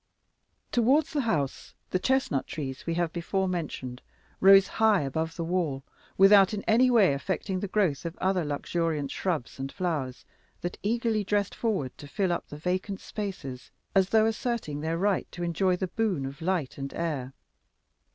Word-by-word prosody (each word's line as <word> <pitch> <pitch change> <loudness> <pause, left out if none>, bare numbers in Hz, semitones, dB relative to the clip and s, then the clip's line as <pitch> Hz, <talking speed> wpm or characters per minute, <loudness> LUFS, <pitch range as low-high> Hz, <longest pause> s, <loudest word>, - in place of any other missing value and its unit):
Towards 270 +7 +3
the 290 - +1
house 155 - -2 0.2
the 185 - +1
chestnut 260 - +1
trees 135 -2 -6
we 165 - 0
have 170 -2 0
before 190 +3 -1
mentioned 150 -8 -4 0.4
rose 195 0 +7
high 220 -4 +3
above 160 +4 -2
the 170 - -3
wall, 165 -6 -1 0.3
without 195 +1 +7
in 200 - -5
any 250 +3 +4
way 215 - +5
affecting 185 +7 -2
the 205 - -3
growth 185 -9 +1
of 170 +1 -5
other 190 -2 +1
luxuriant 150 0 -2
shrubs 160 -10 -3
and 135 0 -4
flowers 150 -8 -3 0.4
that 175 - -4
eagerly 225 0 0
dressed 200 0 0
forward 190 - -2
to 145 - -9
fill 190 +4 0
up 175 - -2
the 145 - -9
vacant 185 +4 -2
spaces, 180 - -6 0.2
as 190 -1 +3
though 220 -1 +4
asserting 225 - -2
their 160 +1 -1
right 195 +1 0
to 175 - -5
enjoy 180 +2 +1
the 190 - -2
boon 190 -9 -1
of 140 +4 -7
light 165 -6 -1
and 135 0 -5
air. 145 -6 -3
180 Hz, 170 wpm, -28 LUFS, 150-205 Hz, 0.4 s, rose